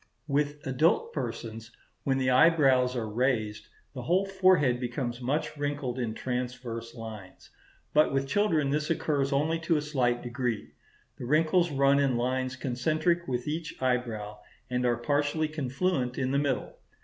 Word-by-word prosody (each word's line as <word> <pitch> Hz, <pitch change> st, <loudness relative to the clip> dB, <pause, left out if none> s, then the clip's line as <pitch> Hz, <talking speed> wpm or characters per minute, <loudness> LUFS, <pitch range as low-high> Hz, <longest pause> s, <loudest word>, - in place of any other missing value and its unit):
With 145 Hz, 0 st, -1 dB
adult 165 Hz, -, +2 dB
persons, 115 Hz, -, -5 dB, 0.4 s
when 135 Hz, -1 st, +2 dB
the 130 Hz, -1 st, +1 dB
eyebrows 130 Hz, -3 st, +4 dB
are 115 Hz, -3 st, -2 dB
raised, 110 Hz, -2 st, -1 dB, 0.3 s
the -, -, -6 dB
whole 185 Hz, +4 st, +2 dB
forehead 185 Hz, -10 st, +3 dB
becomes 125 Hz, 0 st, -3 dB
much 140 Hz, +5 st, -1 dB
wrinkled 145 Hz, -3 st, -2 dB
in 115 Hz, -3 st, -2 dB
transverse 125 Hz, -2 st, -4 dB
lines; 110 Hz, -5 st, -10 dB, 0.4 s
but 150 Hz, +1 st, +4 dB
with 135 Hz, 0 st, 0 dB
children 155 Hz, -4 st, +2 dB
this 150 Hz, +2 st, -1 dB
occurs 145 Hz, -4 st, 0 dB
only 155 Hz, +4 st, +1 dB
to 160 Hz, 0 st, +1 dB
a -, -, 0 dB
slight 125 Hz, -5 st, 0 dB
degree. 120 Hz, -2 st, -3 dB, 0.5 s
The -, -, -5 dB
wrinkles 160 Hz, +5 st, +3 dB
run 140 Hz, -1 st, +3 dB
in 135 Hz, -4 st, +2 dB
lines 130 Hz, +1 st, -1 dB
concentric 155 Hz, +7 st, 0 dB
with 125 Hz, 0 st, -2 dB
each 155 Hz, +1 st, -4 dB
eyebrow, 115 Hz, -5 st, -2 dB, 0.3 s
and 125 Hz, 0 st, +1 dB
are 120 Hz, -1 st, +2 dB
partially 145 Hz, +5 st, 0 dB
confluent 140 Hz, -2 st, -1 dB
in 130 Hz, -1 st, 0 dB
the 140 Hz, -, +2 dB
middle. 140 Hz, -3 st, -2 dB
135 Hz, 150 wpm, -28 LUFS, 125-150 Hz, 0.5 s, eyebrows